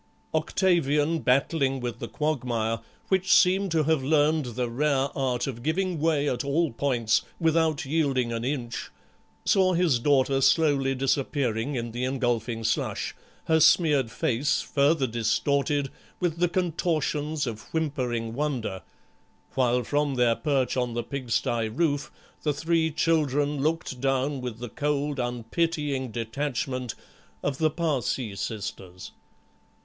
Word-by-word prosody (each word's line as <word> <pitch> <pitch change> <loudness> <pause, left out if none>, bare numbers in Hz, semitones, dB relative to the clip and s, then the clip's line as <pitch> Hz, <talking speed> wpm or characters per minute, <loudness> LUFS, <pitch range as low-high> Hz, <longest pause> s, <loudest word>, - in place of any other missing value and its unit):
Octavian, 160 -2 +2
battling 135 0 +1
with 120 -2 -4
the 115 - -4
quagmire, 120 -7 -1 0.3
which 190 -1 +2
seemed 190 +2 +5
to 160 -2 +2
have 155 -1 +2
learned 150 +1 +3
the 125 -1 -1
rare 135 +2 +1
art 125 -3 0
of 120 -4 -5
giving 175 +4 -1
way 150 -2 +1
at 125 -3 -1
all 150 +3 +1
points 120 -3 +1 0.2
without 160 -3 +2
yielding 135 -5 0
an 115 0 -3
inch, 125 -3 -3 0.6
saw 185 -1 +4
his 170 -8 +2
daughter 135 +1 +2
slowly 140 -3 +3
disappearing 135 -1 0
in 120 -1 -3
the 120 +2 -4
engulfing 120 -3 -1
slush, - - -1 0.3
her 160 0 +3
smeared 150 -5 +4
face 125 +5 0
further 145 0 +2
distorted 140 +4 0 0.3
with 175 -3 -1
the 175 0 +3
contortions 160 -4 -1
of 110 -3 -5
whimpering 125 -8 -2
wonder, 125 -8 -2 0.7
while 125 -1 +2
from 145 0 0
their 120 -2 +3
perch 135 -3 0
on 125 -2 -1
the 120 - -1
pigsty 120 -4 -1
roof 145 +3 0 0.3
the 150 - 0
three 160 +1 +1
children 145 -3 +1
looked 155 -4 -1
down 135 0 0
with 125 -3 -5
the 120 +1 -6
cold 145 +1 -1
unpitying 130 +3 -1
detachment 125 +2 -3 0.5
of 140 -1 -2
the 155 -1 +3
Parcæ 135 -9 -1
Sisters. 95 -3 -6
140 Hz, 130 wpm, -26 LUFS, 120-155 Hz, 0.7 s, seemed